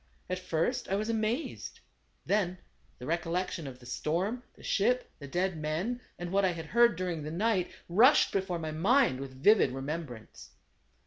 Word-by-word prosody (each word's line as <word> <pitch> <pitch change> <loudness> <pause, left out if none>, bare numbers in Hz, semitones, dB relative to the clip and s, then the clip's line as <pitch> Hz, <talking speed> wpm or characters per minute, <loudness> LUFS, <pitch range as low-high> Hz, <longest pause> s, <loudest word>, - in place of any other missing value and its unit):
At 185 - -1
first, 185 +6 -1
I 195 - +1
was 215 +3 -2
amazed. 225 +6 -2 0.5
Then 190 -3 +1 0.4
the 125 - -9
recollection 170 +1 -2
of 130 -2 -8
the 125 - -16
storm, 180 - -1
the - - -17
ship, 250 +5 +1
the 140 - -8
dead 180 +5 0
men, 165 +11 -2 0.2
and 175 0 -5
what 200 +1 +2
I 185 -2 +2
had 165 -1 -6
heard 235 +6 +4
during 175 -2 -3
the 150 - -5
night, 185 +2 +1 0.2
rushed 245 - +5
before 190 -2 -1
my 160 -2 -4
mind 195 - +3
with 135 0 -9
vivid 210 -9 +6
remembrance. 135 -3 -6
180 Hz, 170 wpm, -30 LUFS, 155-215 Hz, 0.5 s, vivid